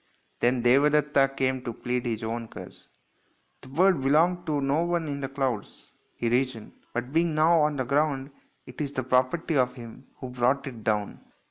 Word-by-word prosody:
Then 120 Hz, 0 st, +1 dB
Devadetta 140 Hz, +2 st, +4 dB
came 130 Hz, -1 st, 0 dB
to 120 Hz, -, -4 dB
plead 125 Hz, +2 st, -3 dB
his 115 Hz, -1 st, -3 dB
own 115 Hz, +1 st, -3 dB
cause. -, -, -12 dB, 0.4 s
" -, -, -41 dB
The -, -, -13 dB
bird 170 Hz, +3 st, +3 dB
belonged 170 Hz, +6 st, +2 dB
to 150 Hz, -2 st, 0 dB
no 140 Hz, +3 st, +1 dB
one 170 Hz, -2 st, -1 dB
in 140 Hz, -1 st, -4 dB
the 135 Hz, -, -3 dB
clouds," 135 Hz, -6 st, -4 dB, 0.2 s
he 120 Hz, -, -2 dB
reasoned, 120 Hz, -2 st, -1 dB
" -, -, -36 dB
but 125 Hz, +3 st, -3 dB
being 165 Hz, -1 st, +2 dB
now 160 Hz, +1 st, +4 dB
on 150 Hz, 0 st, +1 dB
the 130 Hz, -2 st, -2 dB
ground 140 Hz, 0 st, 0 dB, 0.3 s
it -, -, -8 dB
is 145 Hz, -1 st, -3 dB
the 130 Hz, -, -2 dB
property 130 Hz, +6 st, +1 dB
of 125 Hz, -1 st, +1 dB
him 120 Hz, +1 st, -11 dB
who 130 Hz, -, -8 dB
brought 125 Hz, +2 st, +1 dB
it 120 Hz, -5 st, -8 dB
down." 105 Hz, -2 st, -1 dB
135 Hz, 195 wpm, -26 LUFS, 125-150 Hz, 0.4 s, Devadetta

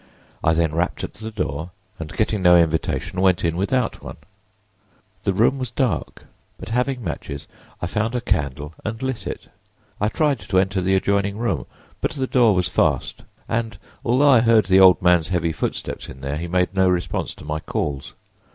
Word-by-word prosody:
I 80 Hz, -, +4 dB
then 80 Hz, -1 st, +1 dB
rapped 85 Hz, +2 st, -1 dB
at -, -, -5 dB
the 110 Hz, +1 st, -7 dB
door, 90 Hz, -7 st, -3 dB, 0.3 s
and 80 Hz, -2 st, -6 dB
getting 110 Hz, -2 st, 0 dB
no 90 Hz, -1 st, +7 dB
invitation 85 Hz, +2 st, 0 dB
went 95 Hz, -2 st, +3 dB
in 85 Hz, -1 st, 0 dB
without 115 Hz, +7 st, -1 dB
one. -, -, -8 dB, 1.1 s
The 100 Hz, -, +3 dB
room 115 Hz, +8 st, +2 dB
was 130 Hz, -2 st, -3 dB
dark, 125 Hz, -2 st, -2 dB, 0.3 s
but 95 Hz, -, -9 dB
having 125 Hz, +2 st, -1 dB
matches 70 Hz, -8 st, -5 dB, 0.4 s
I -, -, +2 dB
found 110 Hz, +6 st, -1 dB
a -, -, +1 dB
candle 70 Hz, -, -2 dB
and 110 Hz, +1 st, -4 dB
lit 130 Hz, -3 st, -3 dB
it. -, -, -6 dB, 0.5 s
I 105 Hz, -, +2 dB
tried 145 Hz, -1 st, +1 dB
to 95 Hz, -, -2 dB
enter 95 Hz, 0 st, +2 dB
the 95 Hz, +1 st, +2 dB
adjoining 100 Hz, +1 st, +1 dB
room, 120 Hz, +1 st, -2 dB, 0.3 s
but -, -, -1 dB
the 135 Hz, -2 st, -2 dB
door 120 Hz, -5 st, +4 dB
was 90 Hz, -1 st, +1 dB
fast, -, -, 0 dB, 0.2 s
and 115 Hz, 0 st, -2 dB, 0.3 s
although 135 Hz, +5 st, +4 dB
I 125 Hz, -, +7 dB
heard 115 Hz, -2 st, +4 dB
the 95 Hz, 0 st, +5 dB
old 95 Hz, 0 st, +7 dB
man's 90 Hz, -3 st, +4 dB
heavy 85 Hz, -3 st, 0 dB
footsteps -, -, -4 dB
in 65 Hz, -, -11 dB
there 70 Hz, +2 st, -3 dB
he 85 Hz, +2 st, -4 dB
made 90 Hz, +1 st, +1 dB
no 95 Hz, -1 st, +3 dB
response 90 Hz, -1 st, -1 dB
to -, -, -13 dB
my 75 Hz, +1 st, -2 dB
calls. 70 Hz, -3 st, -4 dB
95 Hz, 190 wpm, -22 LUFS, 85-115 Hz, 1.1 s, no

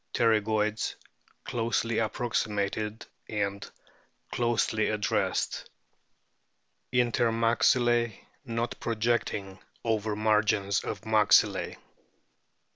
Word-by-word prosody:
Pterygoids 110 Hz, -1 st, +1 dB, 0.5 s
closely 115 Hz, -1 st, -1 dB
approximated 110 Hz, -2 st, -2 dB, 0.2 s
and 100 Hz, -2 st, -2 dB, 0.6 s
closely 115 Hz, -2 st, +1 dB
ad 105 Hz, -1 st, -2 dB
dressed. -, -, -1 dB, 1.2 s
Inter 120 Hz, -1 st, +2 dB
maxilke 120 Hz, 0 st, +2 dB, 0.3 s
not 115 Hz, -2 st, -3 dB
projecting 110 Hz, -4 st, -1 dB, 0.3 s
over 110 Hz, -2 st, 0 dB
margins 105 Hz, -2 st, +2 dB
of -, -, -4 dB
maxillae. 110 Hz, -2 st, +3 dB
110 Hz, 70 wpm, -28 LUFS, 105-115 Hz, 1.2 s, maxillae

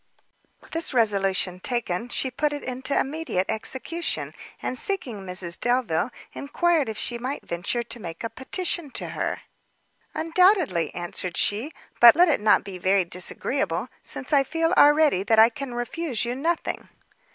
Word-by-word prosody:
This 325 Hz, -4 st, -2 dB
resolution 195 Hz, -5 st, +1 dB
taken, 235 Hz, -1 st, -2 dB
she 260 Hz, +1 st, -1 dB
put 295 Hz, +3 st, 0 dB
it 290 Hz, -, -5 dB
into 260 Hz, +2 st, -1 dB
immediate 275 Hz, -, -1 dB
execution, 270 Hz, +9 st, -3 dB, 0.3 s
and -, -, -3 dB
seeking 255 Hz, -, -2 dB
Mrs 180 Hz, -2 st, -4 dB
Delvile, 240 Hz, -6 st, +1 dB, 0.2 s
enquired 315 Hz, -1 st, +1 dB
if 220 Hz, -, -5 dB
she 240 Hz, +1 st, -3 dB
might 260 Hz, +4 st, -4 dB
venture 175 Hz, +8 st, -2 dB
to 235 Hz, +1 st, -6 dB
make 170 Hz, -3 st, -7 dB
a 230 Hz, -, -2 dB
petition 345 Hz, +3 st, -2 dB
to -, -, -4 dB
her? -, -, -3 dB, 0.7 s
"Undoubtedly," 330 Hz, -, +3 dB
answered 175 Hz, 0 st, -4 dB
she; 225 Hz, +9 st, +1 dB, 0.3 s
"but 240 Hz, +2 st, +10 dB
let 350 Hz, +1 st, +5 dB
it 285 Hz, -, +2 dB
not 210 Hz, -1 st, +4 dB
be 190 Hz, -2 st, -8 dB
very 190 Hz, +1 st, +2 dB
disagreeable, 180 Hz, +3 st, -2 dB
since 270 Hz, -, -4 dB
I 280 Hz, -1 st, +5 dB
feel 325 Hz, +4 st, 0 dB
already 295 Hz, -8 st, +5 dB
that 220 Hz, +3 st, +2 dB
I 220 Hz, +1 st, +8 dB
can 250 Hz, +1 st, -7 dB
refuse 240 Hz, +1 st, -2 dB
you 240 Hz, -, -2 dB
nothing." 325 Hz, +6 st, -2 dB
245 Hz, 150 wpm, -25 LUFS, 195-295 Hz, 0.7 s, but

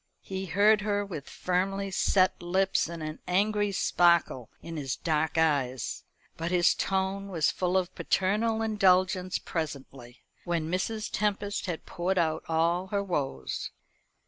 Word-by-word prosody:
He 190 Hz, 0 st, -5 dB
heard 210 Hz, +4 st, +4 dB
her 205 Hz, -1 st, 0 dB
with 160 Hz, -8 st, -7 dB
firmly 195 Hz, +2 st, -1 dB
set 185 Hz, 0 st, +2 dB
lips 185 Hz, 0 st, +1 dB
and 170 Hz, -2 st, -6 dB
an 155 Hz, 0 st, -5 dB
angry 205 Hz, +2 st, +1 dB
sparkle 170 Hz, -, +2 dB
in 165 Hz, 0 st, -8 dB
his 140 Hz, -4 st, -2 dB
dark 160 Hz, 0 st, -1 dB
eyes, 140 Hz, -6 st, 0 dB, 0.3 s
but 165 Hz, +1 st, -2 dB
his 175 Hz, -1 st, +4 dB
tone 195 Hz, +1 st, -1 dB
was 160 Hz, -6 st, +1 dB
full 180 Hz, 0 st, 0 dB
of 185 Hz, -1 st, -1 dB
paternal 220 Hz, +4 st, +1 dB
indulgence 185 Hz, -3 st, +2 dB
presently, 135 Hz, -6 st, -6 dB, 0.2 s
when 165 Hz, -2 st, -2 dB
Mrs. 215 Hz, +4 st, -1 dB
Tempest 205 Hz, -1 st, -1 dB
had 170 Hz, -3 st, -4 dB
poured 185 Hz, +2 st, -2 dB
out 160 Hz, -2 st, +1 dB
all 170 Hz, +3 st, +1 dB
her 200 Hz, +1 st, -1 dB
woes. 135 Hz, -, -3 dB
180 Hz, 140 wpm, -28 LUFS, 160-195 Hz, 0.3 s, heard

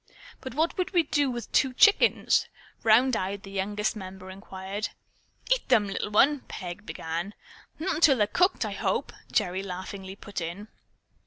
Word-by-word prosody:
"But 260 Hz, -2 st, -8 dB
what 320 Hz, +3 st, +1 dB
would 365 Hz, -, -1 dB
we 345 Hz, -2 st, +4 dB
do 290 Hz, -2 st, +1 dB
with 240 Hz, -2 st, -5 dB
two 265 Hz, -2 st, +3 dB
chickens?" 415 Hz, -, +4 dB, 0.3 s
round 230 Hz, +3 st, +5 dB
eyed, 195 Hz, +1 st, -3 dB
the 195 Hz, -, -10 dB
youngest 205 Hz, +3 st, -1 dB
member 190 Hz, -2 st, -8 dB
inquired. 195 Hz, +2 st, -5 dB, 0.6 s
"Eat -, -, +1 dB
'em, 210 Hz, -, +5 dB
little 195 Hz, +1 st, -3 dB
one," 275 Hz, +8 st, +4 dB
Peg 185 Hz, +2 st, -7 dB
began. 170 Hz, +5 st, -4 dB, 0.4 s
"Not 330 Hz, -1 st, -2 dB
till 280 Hz, -6 st, +6 dB
they're 210 Hz, -, +4 dB
cooked, 360 Hz, -, +2 dB
I -, -, -3 dB
hope," -, -, -1 dB, 0.2 s
Gerry 185 Hz, +1 st, +1 dB
laughingly 190 Hz, 0 st, -7 dB
put 200 Hz, -2 st, -6 dB
in. 175 Hz, +6 st, -6 dB
205 Hz, 160 wpm, -27 LUFS, 190-265 Hz, 0.6 s, till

